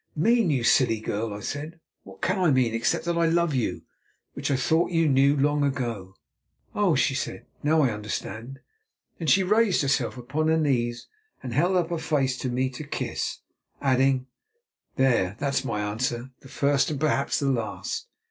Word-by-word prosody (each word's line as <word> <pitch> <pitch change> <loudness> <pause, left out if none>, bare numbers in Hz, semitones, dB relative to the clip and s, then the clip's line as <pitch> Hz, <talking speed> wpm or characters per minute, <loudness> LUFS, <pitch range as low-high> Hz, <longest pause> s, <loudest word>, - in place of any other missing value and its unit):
"Mean, 225 +5 +3
you 135 -5 +1
silly 115 -2 +3
girl," 110 +1 -3
I 105 0 -6
said; 155 +8 -5 0.2
"what - - -15
can - - +1
I 180 -3 +3
mean, 130 -5 +2
except 115 +7 0
that 170 0 0
I 165 - +3
love 170 -1 +2
you, 125 -4 -1 0.5
which - - -3
I 140 - +2
thought 160 +6 +2
you 165 -2 +2
knew 140 +1 +4
long 145 +1 +2
ago." 115 -9 -3 0.6
"Oh!" 200 -6 +2
she 135 +1 +2
said; 135 - -4 0.2
"now 155 +1 +3
I 130 - +2
understand." 110 +5 -6 0.6
Then 165 - -4
she 190 +5 +5
raised 210 -2 +3
herself 135 -2 0
upon 140 +6 -2
her 160 0 +3
knees, 120 -6 0 0.4
and 125 -2 -5
held 175 +8 +2
up 175 -1 0
her 170 - -1
face 140 -5 0
to 130 - -2
me 130 +1 0
to 130 +4 -7
kiss, 140 - -4 0.4
adding, 130 -1 +2 0.7
"There, 120 -8 +2
that's 140 -1 -1
my 110 -5 -2
answer, 120 +4 -2
the 135 - -15
first 140 +1 +1
and 150 -3 -3
perhaps 145 -2 +1
the 140 -1 +1
last. 115 -4 -3
135 Hz, 180 wpm, -26 LUFS, 125-160 Hz, 0.7 s, she